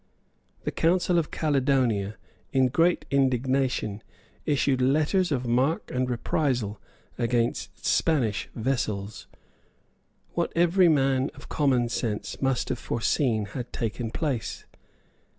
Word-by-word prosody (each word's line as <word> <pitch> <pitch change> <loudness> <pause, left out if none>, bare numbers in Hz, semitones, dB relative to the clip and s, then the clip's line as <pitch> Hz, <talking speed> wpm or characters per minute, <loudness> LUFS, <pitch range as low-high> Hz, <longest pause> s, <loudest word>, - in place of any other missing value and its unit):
The - - -2
Council 175 +1 +2
of 160 - -2
Caledonia, 130 -8 +1 0.4
in 130 -1 +3
great 165 +7 +2
indignation, 130 -5 +1 0.5
issued 140 -3 +2
letters 155 +7 +2
of 130 -3 0
mark 130 +7 +1
and 125 0 0
reprisal 120 -4 -1 0.4
against 120 -1 -1
Spanish 125 -9 +1
vessels. 110 -5 -2 1.0
What - - -1
every 175 +1 +4
man 135 -2 +2
of - - -13
common 130 -5 +2
sense 110 -3 -3
must 135 -2 0
have 125 - -2
foreseen 115 -2 0
had 125 -1 -5
taken 115 0 -3
place. 135 -3 -3
130 Hz, 110 wpm, -26 LUFS, 120-145 Hz, 1.0 s, every